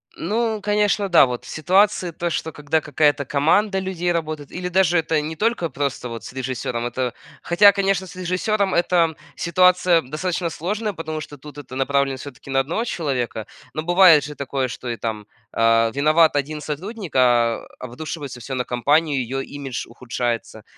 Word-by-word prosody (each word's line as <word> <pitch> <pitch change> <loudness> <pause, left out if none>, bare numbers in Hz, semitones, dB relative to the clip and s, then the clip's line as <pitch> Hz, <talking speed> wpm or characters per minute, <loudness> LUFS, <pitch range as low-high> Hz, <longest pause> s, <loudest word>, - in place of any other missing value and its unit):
Ну, 220 -1 -1
конечно, 205 -1 +1
да, 170 - +7
вот. 125 -1 -5
Ситуации, 185 +2 +2
то 170 +2 -3
что, 160 0 -3
когда 150 +1 -1
какая-то 145 -1 +1
команда 180 +9 +2
людей 180 -2 -2
работает, 155 -4 -3
или 180 0 -4
даже 180 -1 +3
это 160 -1 +1
не 160 +2 -5
только 215 -3 0
просто 140 -3 -3
вот 115 0 -7
с - - -9
режиссёром, 125 -2 -3
это 125 0 -2 0.3
хотя, 200 +4 +6
конечно, 195 -1 0
с - - -12
режиссёром 190 +2 0
это 170 -2 +2 0.2
ситуация 180 0 +3
достаточно 170 +5 -3
сложная, 205 +7 -3
потому 160 -2 -5
что 145 -1 -10
тут 145 +1 -12
это 135 -3 -9
направлено 135 0 +1
всё-таки 135 0 -11
на 135 - +2
одного 170 - -1
человека, 130 - -2 0.3
но 155 - -2
бывает 175 -3 +6
же 150 0 -7
такое, 135 -1 -2
что 125 0 -7
и 115 - -3
там, 110 -2 -4 0.3
а, 115 0 +3
виноват 155 +2 +4
1 150 +2 -2
сотрудник, 180 - -6
а 120 -2 +3
обрушивается 140 +1 -7
всё 130 +3 -5
на 125 - -1
компанию, 145 +3 +1 0.2
её - - -1 0.2
имидж 135 -4 -5
ухудшается. 120 -2 -4
155 Hz, 170 wpm, -22 LUFS, 130-180 Hz, 0.3 s, да